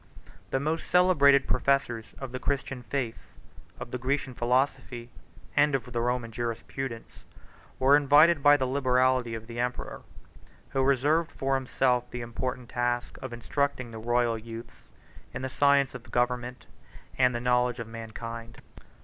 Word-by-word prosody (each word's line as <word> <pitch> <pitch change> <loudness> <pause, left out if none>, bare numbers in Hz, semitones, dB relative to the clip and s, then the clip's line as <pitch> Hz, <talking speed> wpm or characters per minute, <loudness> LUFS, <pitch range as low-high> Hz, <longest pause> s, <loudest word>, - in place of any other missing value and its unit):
33 - - -20 0.2
The 135 - 0
most 155 +4 -2
celebrated 140 -7 +5
professors 120 -5 +1
of 135 -2 -7
the 130 - -4
Christian 135 -1 -2
faith, 120 -2 -3 0.6
of 120 - -7
the 125 - -3
Grecian 135 +1 -1
philosophy, 120 -1 -1 0.4
and 145 -1 +4
of 125 -1 -4
the 120 - 0
Roman 120 -1 -1
jurisprudence, 115 +1 -5 0.5
were 135 +2 +5
invited 145 +3 +5
by 145 +1 +7
the 130 - 0
liberality 130 -2 +2
of 110 0 -7
the 115 +1 -7
emperor, 125 +1 -3 0.7
who 135 - 0
reserved 145 +5 +2
for 135 0 -1
himself 130 -2 +1
the 120 - -6
important 125 +1 -4
task 120 0 -2
of 130 -2 -6
instructing 130 +1 -2
the 110 - -7
royal 120 0 +1
youths 115 +1 -10 0.5
in - - -4
the 130 - -2
science 140 0 +3
of 125 -1 -10
government, 125 +1 -1 0.5
and 125 -1 +4
the - - -1
knowledge 125 0 +1
of 115 - -5
mankind. 115 +1 -8
125 Hz, 150 wpm, -28 LUFS, 120-135 Hz, 0.7 s, by